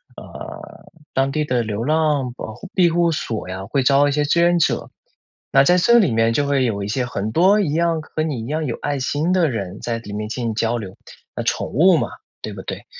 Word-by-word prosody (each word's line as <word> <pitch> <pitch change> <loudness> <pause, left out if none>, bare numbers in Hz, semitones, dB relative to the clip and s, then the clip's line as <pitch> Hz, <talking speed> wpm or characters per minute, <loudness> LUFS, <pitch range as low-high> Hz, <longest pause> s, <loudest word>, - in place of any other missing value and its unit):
呃， - - -10 0.3
当 135 +1 +1
地 150 +2 -1
的 125 -4 0
流 110 0 -3
浪 150 -3 +1
保 110 - -7
护 190 - -11
庇 180 -3 +5
护 170 0 +2
所 115 - -4
呀， 95 +1 -5
会 140 - 0
招 140 +2 +4
一 - - +1
些 150 +1 +1
志 165 +4 +2
愿 175 0 +4
者。 165 - 0 0.6
那 135 - +6
在 175 +6 +4
这 235 +7 +5
里 190 - +2
面 115 0 +2
就 145 +5 +1
会 140 -2 +2
有 100 -4 -2
一 - - -4
些 125 +4 -1
很 110 -3 -3
多 190 - +4
一 185 -8 0
样 165 0 +1
和 155 0 -4
你 145 -7 -3
一 - - -6
样 155 +3 -2
有 120 - -2
爱 145 -1 -1
心 145 +6 -1
的 180 -4 +3
人 100 -4 -5
在 115 -1 -2
里 110 -3 -10
面 105 +1 -4
进 120 +1 -3
行 115 - -1
交 115 +2 0
流。 100 -5 -7 0.4
那 - - -3
宠 - - -1
物 175 +7 +4
嘛， - - -1 0.3
对 - - -5
不 - - -8
对？ - - -6
140 Hz, 260 characters per minute, -20 LUFS, 115-160 Hz, 0.6 s, 那